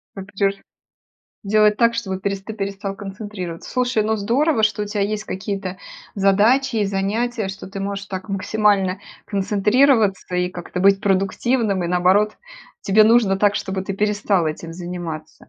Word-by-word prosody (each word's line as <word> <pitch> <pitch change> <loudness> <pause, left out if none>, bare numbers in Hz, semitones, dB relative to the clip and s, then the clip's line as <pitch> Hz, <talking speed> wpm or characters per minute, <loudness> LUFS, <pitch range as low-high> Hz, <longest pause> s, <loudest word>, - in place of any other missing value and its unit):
А 195 - -6
где 195 0 0
ж - - -7 0.9
Делать 210 +1 +4
так, 235 -1 +3
чтобы 190 -5 -3
пересты 200 +2 -4
перестал 195 -1 -4
концентрироваться. 195 -4 -7
Слушай, 250 -3 +1
ну 220 +1 0
здорово, 235 +4 +2
что 215 0 0
у - - -1
тя 205 0 -5
есть 210 +1 -1
какие-то 195 -2 -5 0.4
задачи 225 +7 +3
и 210 - +2
занятия, 210 +3 -1
что 190 0 -7
ты 195 - -7
можешь 200 0 -4
так 190 +2 -6
максимально 195 -1 +1 0.3
концентрироваться, 205 0 +2
и 180 0 +1
как-то 180 0 -6
быть 195 0 +5
продуктивным. 195 +1 0
И, - - -1
наоборот, 185 +4 +2 0.4
тебе 215 +1 +4
нужно 220 -4 +4
так, 205 0 +3
чтобы 190 0 -3
ты 195 - -3
перестал 205 -4 +1
этим 165 +2 -6
заниматься. 175 -3 -7
200 Hz, 155 wpm, -21 LUFS, 190-215 Hz, 0.9 s, быть